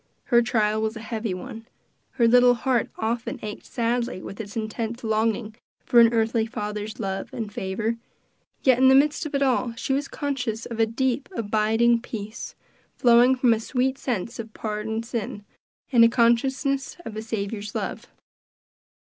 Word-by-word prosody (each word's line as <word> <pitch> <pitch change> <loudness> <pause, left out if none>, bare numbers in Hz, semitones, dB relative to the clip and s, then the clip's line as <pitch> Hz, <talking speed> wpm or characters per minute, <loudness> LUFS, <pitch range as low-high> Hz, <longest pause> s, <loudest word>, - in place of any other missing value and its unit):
Her 240 0 +4
trial 215 -2 +1
was 220 +1 -1
a - - -6
heavy 220 -3 -3
one; 225 +5 -9 0.5
her 235 -3 +3
little 245 +1 +6
heart 245 0 0
often 230 +4 -2
ached 210 -1 -7
sadly 240 -2 -1
with 195 +3 -7
its 205 +1 -8
intense 225 +2 -4
longing 220 0 0 0.3
for 240 - +5
an 230 -1 +7
earthly 225 0 +1
father's 210 -1 -5
love 195 -2 -3
and 215 -3 -5
favor; 215 +5 -2 0.7
yet 255 -2 +4
in 260 - +6
the 265 - +7
midst 295 +3 +3
of 290 - -5
it 280 - +2
all, 250 -3 +1
she 265 - -2
was 275 +1 -1
conscious 250 -6 -3
of 230 -1 -6
a 225 - +4
deep, 260 +3 -1
abiding 225 +1 +2
peace, 215 -2 -7 0.4
flowing 245 +1 +5
from 250 -2 +4
a 220 - -1
sweet 260 +3 -1
sense 235 -1 -3
of 225 -1 -7
pardoned 220 +1 -3
sin, 215 -3 -5 0.5
and 235 -3 +6
a 230 - +7
consciousness 265 +5 +1
of 220 - -6
a 215 - -4
Saviour's 210 -2 -4
love. - - -4
230 Hz, 165 wpm, -25 LUFS, 220-245 Hz, 0.7 s, an